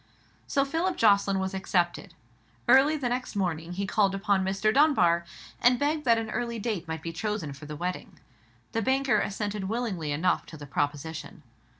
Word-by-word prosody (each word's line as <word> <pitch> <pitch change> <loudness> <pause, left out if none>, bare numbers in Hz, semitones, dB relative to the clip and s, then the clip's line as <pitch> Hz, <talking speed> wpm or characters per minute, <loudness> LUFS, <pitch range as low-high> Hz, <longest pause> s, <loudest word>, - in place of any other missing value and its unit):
So 275 0 +2
Philip 330 +6 -1
Jocelyn 200 -2 +4
was 190 0 -2
accepted. 180 -1 -1 0.5
Early 285 +4 +6
the 265 -4 -2
next 250 -2 -3
morning 175 -3 -2
he 200 +2 -2
called 195 0 +2
again 195 - -5
upon 200 -2 +2
Mr. 195 +3 +1
Dunbar, 215 - +4 0.4
and 245 +1 +5
begged 300 +3 0
that 230 -2 +5
an 225 -1 -3
early 235 -1 -2
date 205 -6 -3
might 160 -1 -5
be 165 - -4
chosen 210 -6 -3
for 145 +2 -11
the 150 - -6
wedding. 180 +4 -5 0.5
The 225 - -1
banker 265 -1 +2
assented 205 0 -3
willingly 205 -10 -2
enough 155 +5 0
to 160 - -10
the 145 - -9
proposition. 145 +3 -4
200 Hz, 180 wpm, -27 LUFS, 170-240 Hz, 0.5 s, Early